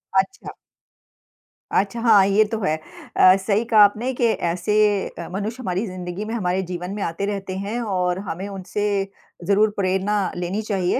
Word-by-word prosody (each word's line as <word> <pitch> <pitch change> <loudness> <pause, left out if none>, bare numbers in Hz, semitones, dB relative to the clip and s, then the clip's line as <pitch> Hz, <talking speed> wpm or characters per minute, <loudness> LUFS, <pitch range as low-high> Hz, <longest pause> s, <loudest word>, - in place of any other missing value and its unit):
अच्छा। 190 - 0 1.2
अच्छा 200 +4 0
हाँ, 215 -5 +6
ये 200 +2 +4
तो 225 - -1
है। 155 -3 +1 0.4
अ, 185 0 +7
सही 205 +3 +1
कहा 225 -2 +3
आपने 220 +6 +2
कि 245 - 0
ऐसे 180 -2 0 0.3
अ, 170 - -8
मनुष्य 205 +5 -4
हमारी 190 0 -2
जिंदगी 180 +2 -5
में, 220 - -5
हमारे 185 -3 0
जीवन 180 +1 -4
में 210 - -5
आते 170 +4 -2
रहते 195 -2 -4
हैं 205 +5 -3
और 180 -4 -1
हमें 185 +4 -4
उनसे 195 +2 -4 0.6
ज़रूर 205 +3 +4
प्रेरणा 195 +2 +1
लेनी 180 +4 -2
चाहिए 195 +1 0
195 Hz, 165 wpm, -22 LUFS, 185-215 Hz, 1.2 s, अ